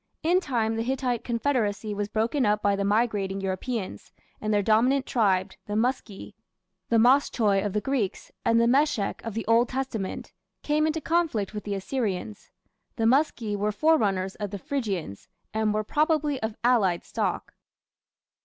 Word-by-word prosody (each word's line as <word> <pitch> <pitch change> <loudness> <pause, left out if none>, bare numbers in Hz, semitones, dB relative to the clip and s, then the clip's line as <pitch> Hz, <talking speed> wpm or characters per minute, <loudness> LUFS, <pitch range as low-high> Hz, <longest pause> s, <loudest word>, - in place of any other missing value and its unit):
In 350 +3 +4
time 230 -9 -1
the - - 0
Hittite 250 -1 -1
confederacy 230 -4 -1
was 205 0 -2
broken 225 +6 0
up 210 -1 +1
by 200 0 +3
the 200 - -1
migrating 205 -2 0
Europeans, 195 +3 -4 0.3
and 215 - -1
their 205 -1 +2
dominant 245 +6 +3
tribe, 195 -5 +1 0.2
the 205 - -3
Muski 225 -3 -2 0.6
the 230 - +3
Moschoi 225 -5 +3
of 205 -2 -2
the 210 - 0
Greeks 255 -8 -2
and 230 0 +3
the 235 - +4
Meshech 250 -4 +1
of 225 -2 -5
the 225 - -3
Old 230 +2 +3
Testament 255 -7 -4 0.3
came 305 +1 +2
into 315 0 -1
conflict 310 - 0
with 210 - -6
the 205 -1 -2
Assyrians. 210 -1 -3 0.5
The 225 -4 0
Muski 235 -4 +2
were 205 +1 0
forerunners 205 -8 +2
of 205 -1 -4
the 200 - -5
Phrygians, 195 - -4 0.3
and 220 -1 +1
were 215 0 0
probably 300 +2 +1
of 220 -1 -3
allied 210 -8 +3
stock. - - -3
220 Hz, 160 wpm, -26 LUFS, 205-260 Hz, 0.6 s, In